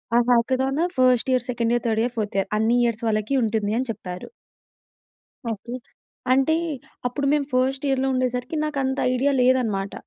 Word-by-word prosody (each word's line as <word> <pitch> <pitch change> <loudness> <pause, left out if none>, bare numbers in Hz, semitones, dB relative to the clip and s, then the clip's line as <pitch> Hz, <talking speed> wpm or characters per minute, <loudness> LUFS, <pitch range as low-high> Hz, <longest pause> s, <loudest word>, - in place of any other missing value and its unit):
ఆ - - +6
hackathon 260 +5 +2
first 255 -1 +3
year, 250 -1 +1
second 235 -1 0
year, 240 - 0
third 220 0 +1
year, 245 - -2
fourth 210 -2 -3
year 195 - 0
అన్ని 225 +2 +2
years 235 -1 -1
వాళ్ళకి 215 +4 0
ఉంటుంది 215 -2 0
అని 260 - -2
చెప్పారు. 180 -4 -8 1.2
ఓకే. 225 +3 -7 0.6
అంటే 270 +4 +3 0.5
అప్పుడు 275 +3 -3
మేము 295 -2 +1
ఫస్ట్ 265 +2 +1
ఇయర్‌లో 270 0 +1
ఉండేసరికి, 255 +3 -1
నాకు 300 -2 -4
అంత 265 +1 -1 0.2
ఐడియా 270 +3 +2
లేదు 255 +1 +5
అన్నమాట. 195 -3 -3
245 Hz, 165 wpm, -23 LUFS, 220-265 Hz, 1.2 s, ఆ